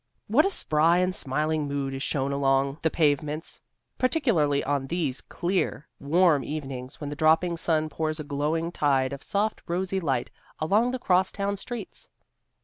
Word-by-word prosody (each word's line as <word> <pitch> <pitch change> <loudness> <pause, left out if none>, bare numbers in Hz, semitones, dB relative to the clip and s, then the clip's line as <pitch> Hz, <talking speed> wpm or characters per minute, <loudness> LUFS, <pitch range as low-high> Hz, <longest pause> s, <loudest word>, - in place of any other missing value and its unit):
What 280 - +4
a - - +1
spry 165 - +2
and 180 0 +1
smiling 150 +3 +1
mood 140 -1 -2
is 135 - -5
shown 135 -1 -1
along 135 +1 +1
the 160 - +2
pavements, 150 0 0 0.4
particularly 220 - +2
on 140 -1 -1
these 150 -5 -1
clear, 175 -4 -2
warm 155 -1 +3
evenings 135 -2 -6
when 145 -1 -5
the - - -4
dropping 160 +3 +3
sun 160 -1 +1
pours 155 0 -3
a - - -3
glowing 150 +4 -1
tide 135 -5 +1
of 140 - -7
soft 210 +1 -1
rosy 185 +2 -1
light 135 -8 -1 0.3
along 205 +10 +2
the 255 - -2
cross 185 -5 +2
town 200 0 -2
streets. 225 +1 -7
155 Hz, 160 wpm, -26 LUFS, 140-180 Hz, 0.4 s, What